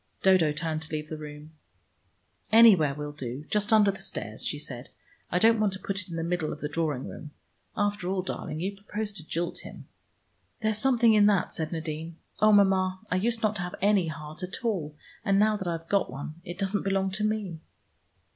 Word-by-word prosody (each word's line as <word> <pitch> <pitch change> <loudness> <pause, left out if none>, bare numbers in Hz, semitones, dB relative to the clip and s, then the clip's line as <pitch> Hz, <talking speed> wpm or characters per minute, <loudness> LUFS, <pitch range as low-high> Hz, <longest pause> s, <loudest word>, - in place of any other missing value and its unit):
Dodo 185 -5 +5
turned 155 +1 -2
to 160 - -9
leave 155 -1 -3
the 155 - -4
room. 150 0 -9 1.0
"Anywhere 200 -11 +7
will 150 0 -5
do. 135 0 -6
Just 210 +1 +1
under 210 -2 +6
the 195 - -10
stairs," 110 - -5
she - - -2
said. 130 -4 -8 0.4
"I - - +1
don't 225 +4 +5
want 210 -3 +2
to 190 - -6
put 195 +1 -3
it 185 - -11
in 170 - -5
the 165 - -2
middle 170 -2 -1
of 150 - -6
the 150 - -2
drawing 150 -3 -2
room. 150 - -8 0.5
After 205 -3 0
all, 190 -1 0
darling, 155 -4 -4
you 195 +2 -2
propose 205 +1 -5
to 190 - -10
jilt 170 +2 -3
him." - - -11 0.7
"There's 215 -1 +1
something 240 -3 +4
in 210 -1 +6
that," 200 -3 +2
said 160 -2 -3
Nadine. 160 0 -4 0.2
"Oh, 215 0 +6
Mama, 190 -2 +4
I - - +2
used 230 +4 0
not 215 0 +1
to - - -3
have 180 0 -4
any 200 -3 +3
heart 155 +1 -7
at 185 +7 -5
all, 165 -10 -1 0.3
and 195 0 +3
now 215 +1 +4
that 190 -3 -4
I've 165 -1 -3
got 200 +1 +1
one 150 +5 -7
it 175 0 -7
doesn't 195 +1 0
belong 195 -1 0
to 200 +3 -2
me." 210 -6 -1
185 Hz, 210 wpm, -28 LUFS, 155-205 Hz, 1.0 s, Anywhere